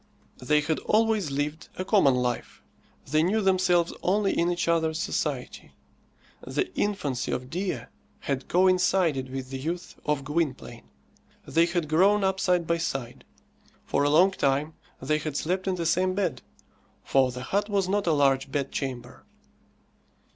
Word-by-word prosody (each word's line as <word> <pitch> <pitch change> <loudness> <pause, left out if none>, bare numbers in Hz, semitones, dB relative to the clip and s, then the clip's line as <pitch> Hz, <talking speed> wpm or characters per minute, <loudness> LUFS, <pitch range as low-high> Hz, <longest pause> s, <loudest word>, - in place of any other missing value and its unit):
They 150 +4 +2
had 155 +1 -1
always 215 -5 +1
lived 145 +3 -3
a 185 - -3
common 185 - +4
life. 125 -1 -3 0.5
They 155 0 +4
knew 190 +7 +2
themselves 185 -3 +2
only 195 +2 +1
in 170 +1 +2
each 175 0 -2
other's 160 -1 +1
society. - - -3 0.7
The 370 -1 -3
infancy 175 - -2
of 125 0 -4
Dea 185 +2 -2 0.4
had 135 -2 -3
coincided 180 -6 +2
with 130 0 -6
the 135 - -4
youth 170 +6 -5
of 145 -2 -1
Gwynplaine. 135 - -3 0.6
They 165 +1 +2
had 175 -2 -1
grown 195 +7 +3
up 190 0 +1
side 180 -3 +2
by 170 +1 0
side. 135 -7 -4 0.6
For - - 0
a 145 - +3
long 180 +6 +5
time 145 -2 0 0.3
they 150 +3 0
had 150 -2 -4
slept 185 +4 -2
in 190 - +1
the 170 -2 -3
same 185 +3 +1
bed, 170 -10 -1 0.6
for 130 -2 +2
the 125 0 -7
hut 205 +10 -1
was 200 -2 +1
not 200 0 0
a - - +4
large 135 -2 +2
bedchamber. 135 -3 -4
165 Hz, 155 wpm, -26 LUFS, 135-185 Hz, 0.7 s, long